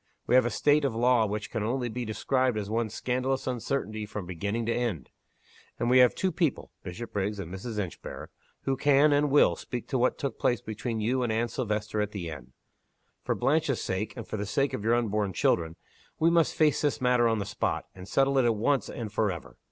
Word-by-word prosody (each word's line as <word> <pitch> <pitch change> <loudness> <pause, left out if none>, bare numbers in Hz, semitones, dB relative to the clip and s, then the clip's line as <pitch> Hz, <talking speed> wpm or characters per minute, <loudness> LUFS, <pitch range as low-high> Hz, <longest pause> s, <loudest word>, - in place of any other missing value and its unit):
We - - 0
have 130 -1 +6
a - - 0
state 145 +4 +3
of 135 -4 0
the - - -5
law 120 -2 +4
which 105 0 -4
can 110 - -2
only 120 +3 -1
be 120 +1 -4
described 125 +2 0
as 105 0 -4
one 115 0 0
scandalous 130 +4 -1
uncertainty 115 -4 -2
from 105 -2 -6
beginning 100 +6 -3
to 115 - +1
end. 115 - -2 0.7
And 120 +1 0
we 130 - +7
have 125 -1 +6
two 190 - 0
people 160 -4 -1
(Bishopriggs 100 +1 -4
and 90 -2 -6
Mrs. 105 +3 -6
Inchbare) 95 -5 -5 0.3
who 135 - 0
can, 145 +2 +4
and 145 +1 +3
will, 145 +2 +5
speak 125 -2 -6
to 130 - 0
what 125 - +2
took 140 - -4
place 125 - +2
between 110 +1 -4
you 125 +4 +1
and 120 -2 0
Anne 115 +2 0
Silvester 110 -3 -2
at 105 0 -3
the 90 -5 -4
inn. 65 -4 -10 0.7
For - - 0
Blanche's 145 -3 +1
sake, 100 +7 -3
and 115 - -7
for - - -4
the 105 0 -3
sake 135 +6 0
of 100 - -3
your 115 +2 +3
unborn 105 -4 0
children, 80 -1 +1 0.4
we 165 +1 +3
must 170 -2 +3
face 155 -2 +3
this 145 -2 0
matter 125 -2 +3
on 115 -1 +1
the 100 - -2
spot - - -2
and 90 0 -11
settle 135 +3 +2
it 130 - +3
at 115 -2 +3
once 130 +6 +1
and 110 -3 -6
forever. 100 -6 -2
115 Hz, 220 wpm, -28 LUFS, 105-130 Hz, 0.7 s, we